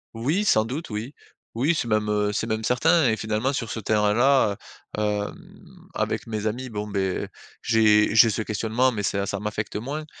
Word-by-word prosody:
Oui, 150 - 0
sans 110 - +4
doute 135 +9 -5
oui. 110 +5 -5 0.4
Oui 140 +9 +2
c'est 120 - -2
même, 110 -1 +1
heu, 105 0 +1
c'est - - -2
même 110 0 -2
certain. 135 +4 +3
Et 110 - 0
finalement, 110 +5 -1
sur 120 -5 -3
ce 110 - -4
terrain-là, 110 +3 +3 0.4
heu, - - -1
hem, 105 -1 -5
avec - - -2
mes 110 -1 -3
amis, 125 +4 -4
bon, 105 -1 -4
beh, 95 -2 -2 0.3
j'ai 110 -2 +3
j'ai 115 +1 +7
ce 110 +1 -2
questionnement 110 +4 0
mais 105 -2 -3
ça 100 0 -1
ça 100 0 -3
m'affecte 105 0 -4
moins. 140 +8 -4
110 Hz, 190 wpm, -24 LUFS, 105-125 Hz, 0.4 s, j'ai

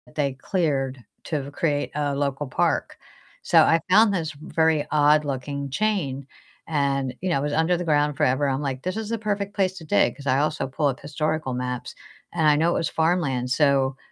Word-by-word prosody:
they 140 -3 0
cleared 135 -3 -1 0.3
to 145 -3 -3
create 145 -2 -1
a 145 -1 -1
local 140 0 -2
park. 130 - 0 0.4
So - - +4
I 165 - +4
found 210 +2 +5
this 165 -5 -2
very 160 0 0
odd-looking 145 -2 +1
chain, 140 -8 -1 0.4
and, 140 -4 0
you 185 - -1
know, 170 - +1
it - - -3
was 145 - -1
under 160 +3 +2
the 175 - -3
ground 150 -3 +1
forever. 130 +3 +2
I'm, 135 +1 -1
like, 135 -2 -4
"This 185 +2 -2
is 220 -1 -4
the 230 - -1
perfect 205 -2 -3
place 190 -1 0
to 165 - -9
dig," - - +2
'cause 140 -1 -10
I 130 +1 +3
also 150 -1 -1
pull 145 +2 0
up 130 - -2
historical 150 -1 -2
maps, 125 0 -4 0.4
and 160 -3 +2
I 150 - +6
know 160 +3 +2
it - - +1
was 160 - -1
farmland. 160 -7 0
So, 135 -2 +2
150 Hz, 195 wpm, -24 LUFS, 135-165 Hz, 0.4 s, I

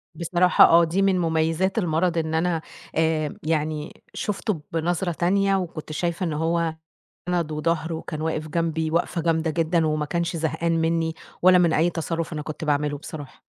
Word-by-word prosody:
بصراحة 175 +2 +5
آه، 170 +1 +6
دي 170 +4 0
من 195 -2 +3
مُميّزات 165 +3 0
المرض 170 -2 +1
إن 160 -1 -1
أنا 165 0 +1 0.3
آآ 160 -2 0
يعني 155 -1 -2
شُفتُه 210 -4 -2
بنظرة 175 +2 0
تانية، 195 +4 +2
وكنت 170 -5 -4
شايفة 170 +3 -2
إنه 160 -4 -1
هو 165 0 0 0.5
ند 170 -3 0
وضهر، 160 +1 -1
وكان 160 -1 -5
واقف 155 -1 -2
جمبي 160 0 -1
وقفة 170 +1 0
جامدة 160 0 +1
جدًا، 165 0 +1
وما 155 -1 0
كانش 170 +2 -2
زهقان 165 +1 0
مِنِّي، 165 0 0 0.3
ولا 185 0 +7
من 170 -2 +3
أي 165 +3 +3
تصرُّف 165 -1 -3
أنا 150 - -3
كنت 155 +2 -6
باعملُه 145 0 0
بصراحة. 145 -2 -10
165 Hz, 165 wpm, -24 LUFS, 155-175 Hz, 0.5 s, ولا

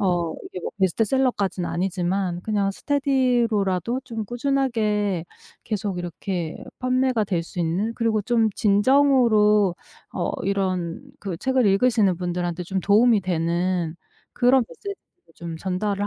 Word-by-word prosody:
어 175 -4 +1
이게 180 - -7
뭐 - - -4
베스트셀러까지는 200 -1 +1
아니지만 180 0 -1
그냥 205 -2 0
스테디로라도 245 - +1
좀 225 -3 -5
꾸준하게 220 - 0 0.4
계속 205 -4 -3
이렇게 175 -1 -4 0.2
판매가 255 -2 +1
될 180 -4 -1
수 170 - -10
있는 180 +7 0
그리고 225 -3 0
좀 225 +1 +2
진정으로 210 -3 +4 0.4
어 - - -1
이런 185 -4 -1 0.2
그 195 -4 -4
책을 260 +4 +1
읽으시는 200 -2 +3
분들한테 175 0 -3
좀 190 +2 -3
도움이 215 +3 +4
되는 170 -1 -1 0.4
그런 250 0 +4
메시지들을 400 0 -7 0.4
좀 170 -1 -7
전달을 200 +3 -1
200 Hz, 300 characters per minute, -23 LUFS, 180-235 Hz, 0.4 s, 진정으로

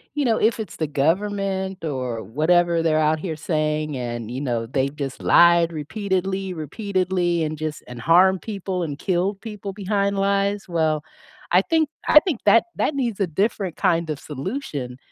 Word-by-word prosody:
you 290 - 0
know, 230 -3 +2
if 225 +1 +2
it's 210 -6 -6
the 155 - -2
government 190 +4 -1
or 125 -6 -3
whatever 165 - +2
they're 155 -1 +2
out 155 0 +2
here 160 -1 -4
saying 155 -2 -1
and 120 -2 -4
you 125 +3 -4
know, 120 -5 -1
they've 135 +3 -1
just 140 -3 -5
lied 170 -1 +5
repeatedly, 190 +3 -2
repeatedly 180 - -1
and 155 0 -3
just 155 0 -4
and 125 -1 -8
harmed 185 +3 +4
people 190 -4 -3
and 145 -3 -5
killed 190 +2 0
people 210 -3 -7
behind 200 0 -1
lies, 200 0 +1
well, 160 -3 0 0.5
I 180 - +7
think 320 +6 +1 0.2
I 300 - +9
think 305 - -3
that 215 +3 +6
that 300 - 0
needs 235 -7 -1
a 195 - +2
different 195 +1 -1
kind 170 -4 +1
of 150 - -3
solution 145 - -5
175 Hz, 170 wpm, -23 LUFS, 150-200 Hz, 0.5 s, I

